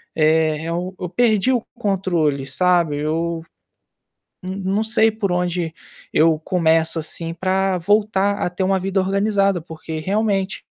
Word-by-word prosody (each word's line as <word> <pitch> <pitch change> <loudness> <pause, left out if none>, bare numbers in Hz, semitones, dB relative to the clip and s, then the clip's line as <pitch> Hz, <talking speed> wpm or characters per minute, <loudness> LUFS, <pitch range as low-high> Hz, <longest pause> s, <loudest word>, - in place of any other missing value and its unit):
Eh, 155 0 +2
eu 175 +3 -3
eu 180 - -3
perdi 220 +4 +2
o 245 -3 +1
controle, 180 - 0
sabe. 170 +1 +2
Eu, 165 +2 -2 1.0
não 185 +1 -5 0.2
não 215 - +1
sei 220 0 +3
por 210 -3 -2
onde 175 -2 -1 0.4
eu 160 0 +4
começo, 165 -1 +1
assim, 165 +1 -3
para 190 +1 0
voltar 205 +1 +2
a - - 0
ter 180 +2 -3
uma 190 0 +2
vida 195 +1 -1
organizada. 195 -1 +1
Porque, 160 -1 -7
realmente, 195 +2 -1
180 Hz, 140 wpm, -20 LUFS, 165-195 Hz, 1.0 s, eu